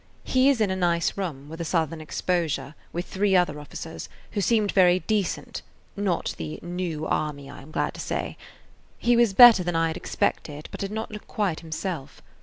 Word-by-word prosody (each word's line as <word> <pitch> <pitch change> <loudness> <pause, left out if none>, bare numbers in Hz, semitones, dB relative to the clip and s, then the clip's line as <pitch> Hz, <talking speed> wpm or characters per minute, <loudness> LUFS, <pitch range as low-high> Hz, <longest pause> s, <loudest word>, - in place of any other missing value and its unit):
He 260 +1 +4
is 275 -4 +2
in 210 -3 +2
a - - 0
nice 170 -2 +1
room, 155 -8 -4
with 160 +2 -7
a - - -1
southern 160 -1 -1
exposure, 155 -4 -1 0.2
with 175 +1 -3
three 195 +1 +1
other 175 -5 +2
officers, 160 +2 -8 0.2
who 205 - -1
seemed 215 -1 +2
very 180 -1 +5
decent 210 -5 -2 0.3
(not 200 -4 -1
the 75 -1 -5
"new 175 -3 -3
army," 145 -3 -2
I 145 - -10
am 140 - -14
glad - - -1
to - - -11
say). - - -3 0.6
He 240 0 +3
was 235 -4 +4
better 235 -6 +9
than 175 -1 -2
I 165 0 +2
had 160 - -4
expected, 150 0 -2
but - - -7
did 195 - -3
not 220 +1 -4
look 210 -1 -9
quite 195 -7 -1
himself. 160 -3 -5
175 Hz, 195 wpm, -25 LUFS, 155-200 Hz, 0.6 s, better